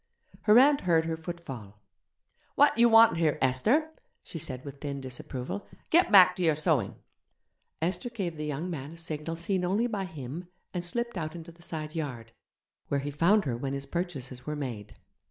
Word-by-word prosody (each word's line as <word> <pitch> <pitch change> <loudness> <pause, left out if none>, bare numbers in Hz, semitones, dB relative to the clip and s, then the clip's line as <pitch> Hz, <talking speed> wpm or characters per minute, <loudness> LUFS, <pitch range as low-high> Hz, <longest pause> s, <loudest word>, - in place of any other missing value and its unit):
Her 215 +1 +7
aunt 280 +3 +6
heard 165 -2 +2
her 165 0 -1
footfall. 150 - -8 0.8
'What - - +5
do 235 - 0
you 235 - +7
want 225 -5 +7
here, 160 -3 +2
Esther?' 220 - +2 0.3
she 165 - -7
said 130 -2 -4
with 140 -1 -9
thin 140 -2 -4
disapproval; 130 +5 -6 0.2
'get 340 -6 +4
back 185 -3 +8
to 180 - -1
your 160 -3 +4
sewing.' 155 -4 +1 0.9
Esther 180 +7 -1
gave 195 -8 -4
the 150 0 -4
young 150 +4 -3
man 150 -3 -5
a - - -12
signal 165 -1 -4
seen 180 +2 -1
only 200 +6 +1
by 210 -5 -2
him 160 +1 -7 0.3
and 175 -2 -2
slipped 235 +3 -3
out 155 0 -4
into 170 0 -9
the 170 +1 -20
side 155 -2 -5
garden, 125 -8 -5 0.5
where 140 - 0
he 145 +1 -4
found 175 +7 +3
her 125 -4 -1
when 135 +3 -3
his 140 0 -3
purchases 140 -6 -4
were 150 - -4
made. 120 -8 -6
160 Hz, 190 wpm, -29 LUFS, 140-185 Hz, 0.9 s, back